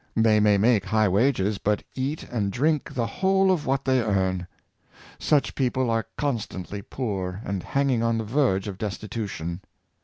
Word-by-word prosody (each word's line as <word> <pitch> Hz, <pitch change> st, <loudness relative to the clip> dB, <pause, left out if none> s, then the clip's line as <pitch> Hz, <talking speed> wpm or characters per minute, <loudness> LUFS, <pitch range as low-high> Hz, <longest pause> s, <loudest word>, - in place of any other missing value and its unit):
They 110 Hz, -1 st, +4 dB
may 105 Hz, -1 st, +4 dB
make 110 Hz, -1 st, +3 dB
high 110 Hz, -1 st, +2 dB
wages, 105 Hz, 0 st, +2 dB
but 105 Hz, 0 st, 0 dB
cat 135 Hz, +4 st, -2 dB
and 105 Hz, -5 st, -1 dB
drink 150 Hz, +6 st, 0 dB
the 120 Hz, -2 st, 0 dB
whole 190 Hz, +9 st, +2 dB
of 170 Hz, -5 st, -1 dB
what 135 Hz, +1 st, 0 dB
they 130 Hz, -1 st, +3 dB
earn. 95 Hz, -4 st, 0 dB, 0.7 s
Such 145 Hz, -2 st, +2 dB
people 130 Hz, -2 st, 0 dB
are 115 Hz, -3 st, 0 dB
constantly 105 Hz, -8 st, -3 dB
poor, 95 Hz, -6 st, -4 dB
and 100 Hz, -2 st, -2 dB
hanging 135 Hz, -1 st, +1 dB
on 115 Hz, 0 st, +1 dB
the 110 Hz, -, -1 dB
verge 110 Hz, -5 st, +1 dB
of 100 Hz, -2 st, -6 dB
destitu 105 Hz, +1 st, -4 dB
tion. 85 Hz, +1 st, -5 dB
110 Hz, 165 wpm, -25 LUFS, 100-130 Hz, 0.7 s, They